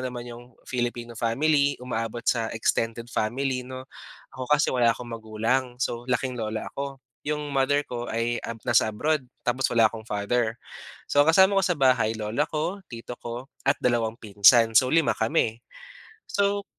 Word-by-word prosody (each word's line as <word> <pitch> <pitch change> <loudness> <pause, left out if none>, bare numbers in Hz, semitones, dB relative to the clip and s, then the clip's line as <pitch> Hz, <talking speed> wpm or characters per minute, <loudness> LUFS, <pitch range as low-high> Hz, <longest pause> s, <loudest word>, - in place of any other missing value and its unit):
naman 125 -1 -5
yung 120 0 -9 0.2
Filipino 120 -1 -3
family, 140 +6 +2
umaabot 115 -2 -4
sa 115 -2 +1
extended 115 +1 -1
family, 125 +3 -1
'no? 130 +1 -8 0.5
Ako 130 +1 -6
kasi 150 -2 +3
wala 120 -2 +4
akong 120 +1 -5
magulang. 115 +3 -1
So, 120 -2 -2
laking 125 0 0
lola 110 -2 -3
ako. 140 -1 -5 0.3
Yung 150 -1 -3
mother 135 +2 +3
ko 120 -1 -4
ay 120 0 -1
ab 115 -1 -6
nasa 110 - +4
abroad, 150 +5 0 0.2
tapos 125 +2 -1
wala 115 -2 +5
akong 110 0 -9
father. 110 +2 -1 0.4
So, 145 - 0
ang 145 - +5
kasama 195 +1 +6
ko - - 0
sa 180 - +1
bahay, 125 -6 +3
lola 110 +7 -1
ko, 165 +6 -2
tito 115 0 -8
ko 120 +3 -7 0.2
at 140 - +5
dalawang 115 -2 +1
pinsan. 110 +2 +5
So, 125 +3 +5
5 160 +2 +3
kami. 110 0 0 0.7
So, 200 0 0
120 Hz, 165 wpm, -26 LUFS, 115-135 Hz, 0.7 s, kasama